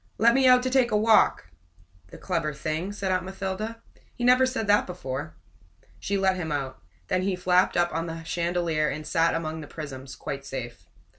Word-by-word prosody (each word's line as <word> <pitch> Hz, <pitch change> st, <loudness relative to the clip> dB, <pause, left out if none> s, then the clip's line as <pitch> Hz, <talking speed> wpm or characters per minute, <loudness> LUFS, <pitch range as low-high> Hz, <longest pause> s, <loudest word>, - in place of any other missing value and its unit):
"Let 235 Hz, +1 st, +5 dB
me 265 Hz, 0 st, +4 dB
out 250 Hz, 0 st, +6 dB
to 255 Hz, -, -1 dB
take 260 Hz, -2 st, +3 dB
a 215 Hz, -, +2 dB
walk!" 215 Hz, -, +3 dB, 0.6 s
"The -, -, -12 dB
clever 165 Hz, -5 st, -2 dB
thing!" 155 Hz, +6 st, -3 dB
said 200 Hz, -2 st, -3 dB
Aunt 185 Hz, 0 st, +1 dB
Mathilda. 195 Hz, +4 st, -5 dB, 0.3 s
"He 245 Hz, -, -5 dB
never 255 Hz, +1 st, +5 dB
said 255 Hz, -4 st, -2 dB
that 205 Hz, 0 st, +3 dB
before." 135 Hz, -8 st, -5 dB, 0.6 s
She 200 Hz, -, -1 dB
let 190 Hz, -1 st, +2 dB
him 160 Hz, -4 st, -4 dB
out. 135 Hz, -8 st, -3 dB, 0.3 s
Then 185 Hz, -, +1 dB
he 190 Hz, 0 st, 0 dB
flapped 180 Hz, +1 st, +2 dB
up 175 Hz, 0 st, +2 dB
on 165 Hz, +1 st, -2 dB
the 165 Hz, 0 st, -6 dB
chandelier 170 Hz, -2 st, 0 dB
and 155 Hz, +2 st, -5 dB
sat 165 Hz, +2 st, +2 dB
among 160 Hz, -1 st, -3 dB
the 150 Hz, -, -9 dB
prisms, 135 Hz, -4 st, -8 dB
quite 140 Hz, 0 st, -6 dB
safe. 130 Hz, -4 st, -7 dB
180 Hz, 195 wpm, -26 LUFS, 155-205 Hz, 0.6 s, out